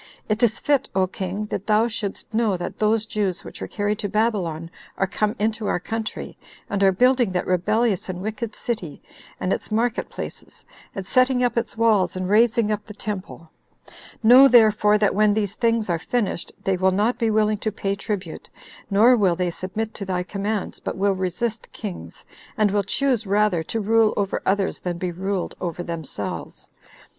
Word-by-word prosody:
It 215 0 -1
is 235 -2 +3
fit, 285 -2 +1
O 190 -1 +3
king, 190 +2 -4
that 195 - -4
thou 215 +2 +4
shouldst 215 -1 -5
know 220 -4 +1
that 175 - -6
those 215 0 +2
Jews 200 -5 -2
which - - -10
were - - -3
carried 205 0 -2
to 205 - -2
Babylon 180 -7 -1 0.3
are 195 - +2
come 210 +3 -1
into 215 0 -1
our - - 0
country, 220 +3 -5 0.3
and 200 -1 -1
are 195 -1 +6
building 250 +2 +3
that 180 - -1
rebellious 200 +3 +1
and 180 -1 -4
wicked 215 +3 -4
city, 185 -11 -4 0.4
and 185 - 0
its - - -5
market 235 +3 0
places, - - -8 0.3
and 195 - -4
setting 255 +3 +3
up 245 -1 +1
its 235 -1 -2
walls, 220 -5 +3
and 185 0 -2
raising 225 0 +3
up 210 0 -2
the 210 - -10
temple; 190 -6 -6 0.7
know 250 +5 +9
therefore, 215 -4 +5
that 210 -1 +2
when 210 0 +3
these 205 -3 -1
things 230 -1 +1
are 170 -2 0
finished, 210 -1 -2
they 190 -1 +1
will 190 +1 +3
not 210 +6 +1
be 230 - +2
willing 215 -1 +2
to 215 - -2
pay 200 -1 -2
tribute, 200 -4 -5 0.4
nor 220 +5 +6
will 190 -6 +2
they 180 0 -1
submit 210 +6 -4
to 200 - -6
thy 185 -2 -2
commands, 200 +2 -3
but - - -5
will 200 +1 +2
resist 190 +5 -3
kings, 205 -5 -8 0.3
and 210 -2 +3
will 205 0 +2
choose 245 +1 0
rather 205 -3 +2
to 225 +8 -3
rule 220 +1 +3
over 200 -1 -1
others 195 0 +1
than 175 -1 -3
be 180 0 -3
ruled 190 +2 -3
over 175 -1 -3
themselves. 165 -4 -6
210 Hz, 185 wpm, -23 LUFS, 190-225 Hz, 0.7 s, know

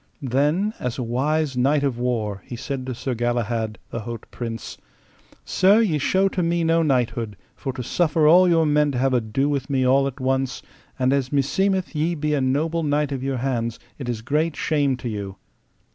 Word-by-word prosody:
Then 150 - +1
as 125 -1 -3
a 130 - -2
wise 140 +4 0
knight 140 +4 +2
of 130 -4 -1
war, 110 -5 -1
he 120 - -6
said 130 +2 -5
to 130 - -3
Sir 130 +2 -3
Galahad, 115 -2 -1
the 115 - -3
haut 115 0 -7
prince: 115 -2 -6 0.7
Sir, 195 +4 +4
ye 180 -10 +2
show 190 +7 +2
to 185 - -2
me 170 0 +1
no 165 0 +3
knighthood, 120 -7 0 0.2
for 135 - -4
to 125 -1 -5
suffer 160 +3 +1
all 180 +4 +7
your 165 -2 +4
men 150 -1 +3
to - - -2
have 135 +1 +2
ado 125 +3 +1
with 140 -1 -2
me 130 -2 +1
all 135 +2 +4
at 140 +1 -6
once; 130 0 -1 0.3
and 130 0 +2
as 135 -2 0
meseemeth 185 +8 +1
ye 160 +3 0
be 150 -1 -1
a 145 - +1
noble 155 +6 0
knight 150 -1 0
of 135 -2 -3
your 135 -1 -1
hands 120 -3 -2 0.2
it 130 -3 -5
is 110 -2 -3
great 150 +5 0
shame 145 -4 +1
to 125 - -6
you. 100 -4 -5
135 Hz, 200 wpm, -23 LUFS, 120-155 Hz, 0.7 s, all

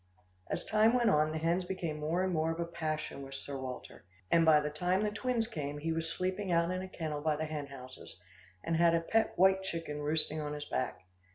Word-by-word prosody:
As - - -3
time 220 +1 +4
went 240 -3 +4
on, 155 -1 +3
the 160 - -2
hens 170 +3 +1
became 175 -4 -3
more 165 +5 0
and 185 -1 0
more 160 0 +1
of 165 - -5
a 170 - 0
passion 155 -4 -3
with 135 0 -8
Sir 140 +1 -6
Walter, 130 -2 -7 0.3
and 165 - +6
by 160 -2 +7
the 150 0 -2
time 180 +6 +1
the 210 - 0
twins 240 +1 0
came 145 -10 -4
he 160 +3 -2
was 165 0 -2
sleeping 185 +2 -2
out 170 +1 +3
in 185 0 -2
a 190 - -6
kennel 155 -5 -4
by 155 0 +1
the 155 +1 -2
hen 150 -2 -4
houses, 130 -7 -10 0.5
and 165 -1 0
had 170 0 +5
a 165 - +2
pet 225 +6 +1
white 190 +1 +5
chicken 165 -5 -4
roosting 155 +1 +1
on 150 0 -3
his 150 0 -5
back. 125 -7 -2
165 Hz, 235 wpm, -32 LUFS, 150-185 Hz, 0.5 s, by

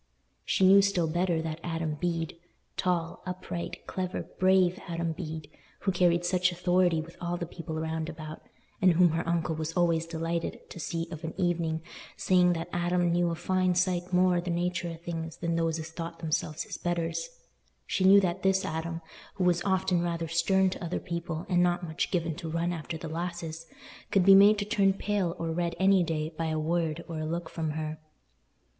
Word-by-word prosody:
She 190 - +2
knew 195 +1 +8
still 195 -4 +2
better, 170 0 0
that 160 0 -4
Adam 165 -2 -2
Bede—tall, 170 +1 -3
upright, 180 -1 -5
clever, 185 -1 -3 0.2
brave 185 -1 +4
Adam 170 -1 -2
Bede—who 160 +3 -5
carried 175 -1 +3
such 180 +1 +2
authority 180 -1 +2
with 165 +2 -8
all 175 0 -2
the 170 - -3
people 165 -1 -7
round 160 0 -2
about, 155 -1 -8 0.4
and 185 -1 +6
whom 175 +1 +5
her 165 +1 0
uncle 170 -1 0
was 160 +1 -3
always 165 -2 +2
delighted 165 0 -3
to - - -8
see 165 +1 -3
of 160 -1 -7
an 160 - -5
evening, 165 -3 0 0.3
saying 180 -1 +4
that 165 -1 -4
"Adam 175 0 +1
knew 175 0 +2
a 165 - -2
fine 185 +1 +1
sight 180 0 0
more 180 0 +4
o' - - +1
the 180 - -5
natur 175 0 -1
o' 165 - -5
things 165 -1 -5
than 170 0 -1
those 165 -1 +1
as 160 0 -6
thought 165 0 -6
themselves 155 -1 -2
his - - -7
betters"—she 175 - -4
knew 195 +2 +8
that 185 -1 -1
this 190 0 +2
Adam, 165 +1 -3 0.3
who 190 - -1
was 175 -1 +3
often 190 -2 +1
rather 170 -1 -2
stern 190 +4 +3
to 190 - -6
other 170 +1 -2
people 170 -2 -4
and 180 -2 +3
not 175 0 +2
much 160 0 -2
given 170 -3 0
to 165 +1 -6
run 170 +2 0
after 160 0 -5
the 165 - -7
lasses, 165 0 -5 0.4
could 195 -3 +3
be 195 - +9
made 200 +2 +8
to 205 - -1
turn 195 -2 +3
pale 195 -3 -1
or 165 -1 -2
red 170 0 -1
any 190 0 +5
day 160 -1 -2
by 165 +1 -2
a 155 0 -1
word 165 0 -1
or 165 -2 -5
a 155 - -2
look 170 +1 -3
from 160 -2 -2
her. 155 0 -4
170 Hz, 190 wpm, -29 LUFS, 165-180 Hz, 0.4 s, be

